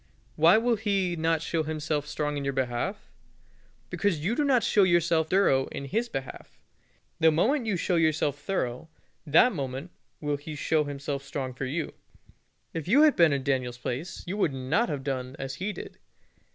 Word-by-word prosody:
Why 170 Hz, +6 st, +6 dB
will 230 Hz, 0 st, +2 dB
He 195 Hz, -4 st, 0 dB
not 165 Hz, 0 st, 0 dB
show 165 Hz, 0 st, -1 dB
Himself 155 Hz, -1 st, -2 dB
strong 150 Hz, 0 st, -2 dB
in 140 Hz, -, -3 dB
your 140 Hz, 0 st, -1 dB
behalf? 130 Hz, -, -3 dB, 0.8 s
Because 170 Hz, -7 st, 0 dB
you 210 Hz, -, +1 dB
do 295 Hz, -, +1 dB
not 260 Hz, -5 st, +3 dB
show 205 Hz, -, +3 dB
yourself 170 Hz, -3 st, +3 dB
thorough 160 Hz, -9 st, +3 dB
in 140 Hz, -, -6 dB
His 225 Hz, -, -1 dB
behalf. 135 Hz, -1 st, -7 dB, 0.6 s
The 160 Hz, -, +6 dB
moment 230 Hz, -, +1 dB
you 200 Hz, -4 st, +1 dB
show 175 Hz, +1 st, 0 dB
yourself 155 Hz, -3 st, +1 dB
thorough, 155 Hz, -6 st, -3 dB, 0.4 s
that 165 Hz, -, +5 dB
moment 135 Hz, +1 st, -5 dB, 0.3 s
will 145 Hz, -1 st, -1 dB
He 150 Hz, +2 st, -8 dB
show 150 Hz, +1 st, +1 dB
Himself 140 Hz, 0 st, -4 dB
strong 135 Hz, -2 st, -4 dB
for 135 Hz, +2 st, -4 dB
you. 155 Hz, +5 st, -3 dB, 0.8 s
If 165 Hz, -1 st, -4 dB
you 270 Hz, +10 st, +6 dB
had 305 Hz, -2 st, +5 dB
been 170 Hz, -3 st, +5 dB
in 140 Hz, -1 st, -1 dB
Daniel's 130 Hz, -3 st, -1 dB
place 135 Hz, +8 st, -5 dB
you 185 Hz, +4 st, -4 dB
would 165 Hz, -9 st, +1 dB
not 135 Hz, -, 0 dB
have 140 Hz, -2 st, -3 dB
done 130 Hz, -1 st, -3 dB
as 135 Hz, 0 st, -5 dB
he 205 Hz, +3 st, -1 dB
did. -, -, -9 dB
155 Hz, 180 wpm, -27 LUFS, 140-190 Hz, 0.8 s, Why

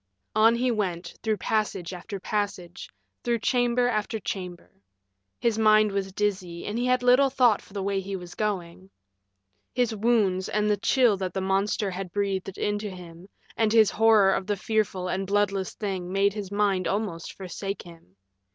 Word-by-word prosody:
On 225 Hz, +2 st, +5 dB
he 250 Hz, +1 st, +1 dB
went, 180 Hz, -6 st, -2 dB
through 220 Hz, -2 st, 0 dB
passage 200 Hz, -5 st, -1 dB
after 195 Hz, +3 st, -7 dB
passage, 200 Hz, -4 st, -4 dB, 0.3 s
through 240 Hz, -1 st, +1 dB
chamber 245 Hz, +1 st, +2 dB
after 220 Hz, -1 st, -1 dB
chamber. 180 Hz, -, -6 dB, 0.7 s
His 230 Hz, -2 st, +1 dB
mind 215 Hz, -1 st, +5 dB
was 195 Hz, -1 st, -2 dB
dizzy, 185 Hz, -4 st, -2 dB
and 215 Hz, +3 st, -3 dB
he 245 Hz, -, 0 dB
had 250 Hz, 0 st, +2 dB
little 250 Hz, +3 st, +5 dB
thought 245 Hz, -5 st, +3 dB
for -, -, -18 dB
the 200 Hz, -2 st, -3 dB
way 195 Hz, 0 st, 0 dB
he 195 Hz, +1 st, -5 dB
was 180 Hz, -1 st, -8 dB
going. 190 Hz, -3 st, -3 dB, 0.9 s
His 240 Hz, -3 st, +1 dB
wounds 205 Hz, -4 st, +1 dB
and 210 Hz, 0 st, +1 dB
the 205 Hz, -, +2 dB
chill 235 Hz, 0 st, +3 dB
that 185 Hz, -2 st, -4 dB
the -, -, 0 dB
monster 195 Hz, +2 st, 0 dB
had 185 Hz, 0 st, -6 dB
breathed 195 Hz, -1 st, -2 dB
into 205 Hz, 0 st, -2 dB
him 180 Hz, 0 st, -11 dB, 0.3 s
and 220 Hz, -1 st, +2 dB
his 220 Hz, -2 st, +5 dB
horror 220 Hz, -3 st, +5 dB
of 190 Hz, -, -2 dB
the 205 Hz, -1 st, 0 dB
fearful 195 Hz, -3 st, -1 dB
and 190 Hz, +1 st, -2 dB
bloodless 200 Hz, -1 st, 0 dB
thing 190 Hz, -4 st, -4 dB
made 200 Hz, +1 st, +2 dB
his 205 Hz, -2 st, -6 dB
mind 200 Hz, -2 st, +1 dB
almost 195 Hz, -5 st, -3 dB
forsake 195 Hz, +1 st, -5 dB
him. 165 Hz, -, -16 dB
200 Hz, 170 wpm, -26 LUFS, 185-215 Hz, 0.9 s, On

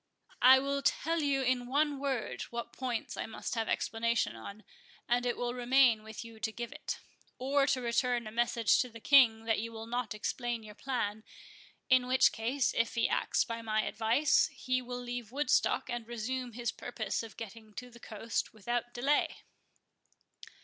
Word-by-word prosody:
I 260 Hz, +1 st, +9 dB
will 280 Hz, +1 st, -1 dB
tell 330 Hz, +3 st, +1 dB
you 275 Hz, -2 st, +1 dB
in 250 Hz, -1 st, +1 dB
one 290 Hz, +2 st, +1 dB
word 270 Hz, -5 st, -2 dB
what 235 Hz, 0 st, -5 dB
points 250 Hz, -3 st, -3 dB
I -, -, -4 dB
must 225 Hz, -, -5 dB
have 225 Hz, -2 st, -1 dB
explanation 230 Hz, -, 0 dB
on; 200 Hz, -, -9 dB, 0.4 s
and 245 Hz, +1 st, +1 dB
it 240 Hz, -, -1 dB
will 245 Hz, 0 st, -2 dB
remain 245 Hz, -2 st, +4 dB
with 220 Hz, +1 st, -8 dB
you 225 Hz, -1 st, -12 dB
to 220 Hz, -, -2 dB
give 235 Hz, +1 st, -6 dB
it, -, -, -5 dB, 0.4 s
or 275 Hz, +2 st, +2 dB
to 265 Hz, -2 st, +1 dB
return 240 Hz, 0 st, +1 dB
a 215 Hz, -, -6 dB
message 235 Hz, -1 st, +2 dB
to 250 Hz, -, -3 dB
the 230 Hz, 0 st, -11 dB
King 230 Hz, -4 st, +5 dB
that 225 Hz, -1 st, +1 dB
you 230 Hz, +2 st, -4 dB
will 225 Hz, 0 st, -7 dB
not 235 Hz, -2 st, -3 dB
explain 240 Hz, +2 st, -3 dB
your 210 Hz, -1 st, -10 dB
plan; 220 Hz, -3 st, -3 dB, 0.6 s
in 255 Hz, -2 st, +4 dB
which 260 Hz, +1 st, +5 dB
case, 245 Hz, +4 st, 0 dB
if 230 Hz, 0 st, 0 dB
he 230 Hz, -, +2 dB
acts -, -, +1 dB
by 230 Hz, 0 st, -5 dB
my 215 Hz, -1 st, 0 dB
advice, 230 Hz, +7 st, +3 dB
he 255 Hz, 0 st, -2 dB
will 245 Hz, 0 st, -6 dB
leave 245 Hz, -2 st, -5 dB
Woodstock, 290 Hz, +3 st, +1 dB
and 240 Hz, -2 st, -4 dB
resume 240 Hz, +1 st, -4 dB
his 235 Hz, 0 st, -2 dB
purpose 225 Hz, -4 st, -3 dB
of 225 Hz, -2 st, -10 dB
getting 220 Hz, 0 st, -9 dB
to 250 Hz, 0 st, -7 dB
the 235 Hz, -, -14 dB
coast 225 Hz, +1 st, -4 dB
without 240 Hz, +3 st, -3 dB
delay." 275 Hz, +5 st, +1 dB
240 Hz, 180 wpm, -32 LUFS, 225-255 Hz, 0.6 s, I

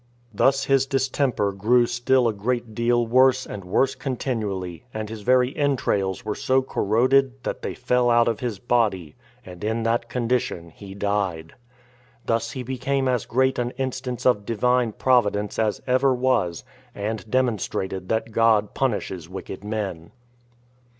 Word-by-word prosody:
This 135 Hz, +6 st, +2 dB
his 135 Hz, -1 st, +3 dB
distemper 130 Hz, -5 st, 0 dB
grew 115 Hz, +5 st, +3 dB
still 120 Hz, +1 st, +2 dB
a 115 Hz, -, 0 dB
great 115 Hz, +2 st, -2 dB
deal 120 Hz, +1 st, +1 dB
worse 130 Hz, +2 st, +4 dB
and 100 Hz, -, -7 dB
worse 130 Hz, +9 st, +1 dB
continually, 105 Hz, -, -4 dB
and 110 Hz, -1 st, -4 dB
his 110 Hz, 0 st, -7 dB
very 125 Hz, +3 st, +2 dB
entrails 115 Hz, -, 0 dB
were 105 Hz, -, -1 dB
so 130 Hz, +4 st, +1 dB
corroded, 130 Hz, +4 st, +2 dB
that -, -, -4 dB
they -, -, -4 dB
fell 125 Hz, -1 st, +1 dB
out 120 Hz, 0 st, +4 dB
of 115 Hz, -2 st, 0 dB
his 120 Hz, -5 st, -3 dB
body, 100 Hz, -8 st, 0 dB, 0.3 s
and 90 Hz, 0 st, -10 dB
in 110 Hz, +2 st, -1 dB
that 115 Hz, +1 st, 0 dB
condition 115 Hz, -9 st, -1 dB
he 95 Hz, +2 st, -11 dB
died. 100 Hz, -5 st, -2 dB, 0.7 s
Thus 115 Hz, 0 st, -1 dB
he 130 Hz, -, -5 dB
became 130 Hz, +2 st, -1 dB
as 125 Hz, -4 st, 0 dB
great 130 Hz, +2 st, +1 dB
an 120 Hz, 0 st, -2 dB
instance 130 Hz, -2 st, -4 dB
of 115 Hz, -5 st, +3 dB
Divine 120 Hz, +1 st, +1 dB
Providence 105 Hz, -6 st, +1 dB
as 110 Hz, -2 st, 0 dB
ever 130 Hz, +1 st, +3 dB
was, 120 Hz, -10 st, 0 dB, 0.3 s
and 110 Hz, +1 st, -4 dB
demonstrated 105 Hz, -6 st, -1 dB
that 110 Hz, 0 st, -1 dB
God 110 Hz, -2 st, +3 dB
punishes 100 Hz, -9 st, -2 dB
wicked 95 Hz, +1 st, -8 dB
men. 100 Hz, -6 st, -4 dB
115 Hz, 150 wpm, -24 LUFS, 105-130 Hz, 0.7 s, worse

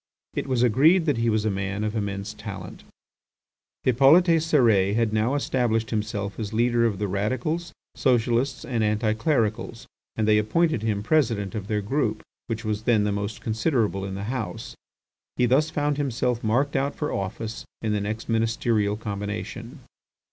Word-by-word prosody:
It -, -, -3 dB
was 125 Hz, -2 st, +1 dB
agreed 155 Hz, -, +4 dB
that 145 Hz, -6 st, +1 dB
he 115 Hz, 0 st, +1 dB
was 110 Hz, -1 st, +1 dB
a 110 Hz, -, +1 dB
man 100 Hz, +1 st, -3 dB
of 105 Hz, +1 st, -2 dB
immense 100 Hz, 0 st, -3 dB
talent. 100 Hz, -4 st, -8 dB, 1.0 s
Hippolyte 155 Hz, +7 st, +5 dB
Cérès 115 Hz, -11 st, +3 dB
had 115 Hz, -2 st, +1 dB
now 110 Hz, +5 st, +1 dB
established 120 Hz, -5 st, 0 dB
himself 105 Hz, -2 st, -3 dB
as 105 Hz, -1 st, -4 dB
leader 120 Hz, +1 st, +3 dB
of 105 Hz, -4 st, -2 dB
the 105 Hz, +1 st, -1 dB
radicals, 130 Hz, -, -2 dB, 0.2 s
socialists, 125 Hz, +1 st, +1 dB
and 115 Hz, -4 st, -1 dB
anti 110 Hz, +1 st, +1 dB
clericals, 110 Hz, -2 st, -1 dB, 0.3 s
and 110 Hz, -1 st, 0 dB
they 105 Hz, 0 st, +5 dB
appointed 120 Hz, +5 st, +1 dB
him 105 Hz, -2 st, -1 dB
President 110 Hz, -8 st, +1 dB
of 105 Hz, -3 st, -5 dB
their 105 Hz, -1 st, 0 dB
group, 110 Hz, -2 st, -1 dB, 0.2 s
which 110 Hz, -1 st, -4 dB
was 105 Hz, -1 st, -1 dB
then 110 Hz, -4 st, +3 dB
the 105 Hz, -, 0 dB
most 100 Hz, +1 st, -3 dB
considerable 110 Hz, -3 st, 0 dB
in 95 Hz, -1 st, -4 dB
the 100 Hz, -, -5 dB
House. 115 Hz, 0 st, -5 dB, 0.6 s
He 125 Hz, -, +3 dB
thus 140 Hz, +6 st, +3 dB
found 145 Hz, -2 st, -1 dB
himself 125 Hz, -4 st, -1 dB
marked 130 Hz, +7 st, +1 dB
out 140 Hz, +1 st, 0 dB
for 150 Hz, -, -3 dB
office 110 Hz, +3 st, -4 dB, 0.2 s
in 110 Hz, -1 st, 0 dB
the 105 Hz, -, 0 dB
next 110 Hz, +2 st, -4 dB
ministerial 115 Hz, -2 st, +1 dB
combination. 110 Hz, +5 st, -5 dB
110 Hz, 165 wpm, -25 LUFS, 105-130 Hz, 1.0 s, Hippolyte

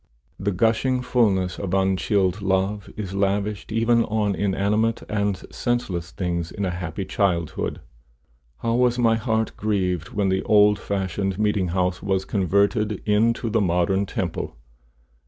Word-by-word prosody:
The 100 Hz, +1 st, 0 dB
gushing 115 Hz, +6 st, +1 dB
fulness 95 Hz, -8 st, +1 dB
of 95 Hz, -1 st, -2 dB
unchilled 95 Hz, 0 st, +1 dB
love 95 Hz, +1 st, 0 dB
is 100 Hz, -3 st, -5 dB
lavished 100 Hz, +1 st, -1 dB
even 115 Hz, +1 st, +3 dB
on 105 Hz, -2 st, 0 dB
inanimate 105 Hz, +4 st, 0 dB
and 100 Hz, -2 st, 0 dB, 0.2 s
senseless 95 Hz, -9 st, -2 dB
things, 85 Hz, -1 st, -3 dB
in 100 Hz, -, -3 dB
a 90 Hz, -, -1 dB
happy 90 Hz, +1 st, -4 dB
childhood. 85 Hz, -6 st, -1 dB, 0.8 s
How 115 Hz, -, 0 dB
was 125 Hz, 0 st, +2 dB
my 115 Hz, -2 st, +3 dB
heart 110 Hz, -1 st, -1 dB
grieved 90 Hz, -5 st, -1 dB
when 100 Hz, -2 st, 0 dB
the 95 Hz, 0 st, +1 dB
old 105 Hz, -1 st, +4 dB
fashioned 95 Hz, -1 st, -2 dB
meeting 105 Hz, -3 st, +1 dB
house 90 Hz, 0 st, -1 dB
was 95 Hz, -1 st, 0 dB
converted 100 Hz, +2 st, +1 dB
into 115 Hz, +3 st, +2 dB
the 110 Hz, 0 st, +2 dB
modern 95 Hz, +2 st, +1 dB
temple! 85 Hz, -9 st, -3 dB
100 Hz, 140 wpm, -23 LUFS, 95-110 Hz, 0.8 s, old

